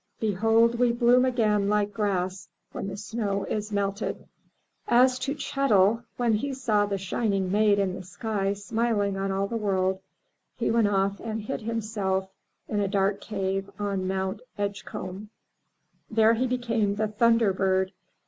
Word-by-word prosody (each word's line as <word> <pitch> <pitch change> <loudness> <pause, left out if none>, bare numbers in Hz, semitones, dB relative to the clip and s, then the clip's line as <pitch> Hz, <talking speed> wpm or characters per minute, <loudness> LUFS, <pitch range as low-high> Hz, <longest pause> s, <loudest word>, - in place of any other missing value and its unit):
Behold 225 +3 +3
we 245 -1 +4
bloom 240 +1 +4
again 215 -5 +2
like 205 0 +1
grass 190 -3 -2 0.2
when - - -5
the 195 - -5
snow 205 -2 -2
is 210 0 -3
melted!" 200 0 -2 0.6
As 255 +1 +4
to 280 +3 -2
Chet'l, 230 -6 +2
when 240 -2 +2
he 270 +6 -1
saw 215 -6 +1
the 200 -1 -1
shining 195 0 -1
Maid 210 0 +4
in 195 -2 0
the 190 - -6
sky 195 +2 -2
smiling 205 0 -1
on 195 0 -2
all 195 +1 0
the 230 +3 -3
world, 190 -3 0 0.6
he - - 0
went 230 -2 +3
off 195 0 +1
and 220 -1 -4
hid 215 - -4
himself 210 -4 -2 0.4
in 210 - -1
a 200 - +1
dark 195 0 0
cave 195 -1 -2
on 200 -2 -2
Mt. 190 0 -2 0.2
Edgecomb. 200 -1 -5 0.8
There 220 0 +4
he 250 +3 0
became 230 -5 0
the 215 +1 0
Thunder 230 -1 +3
bird. 190 0 +1
205 Hz, 155 wpm, -26 LUFS, 195-230 Hz, 0.8 s, we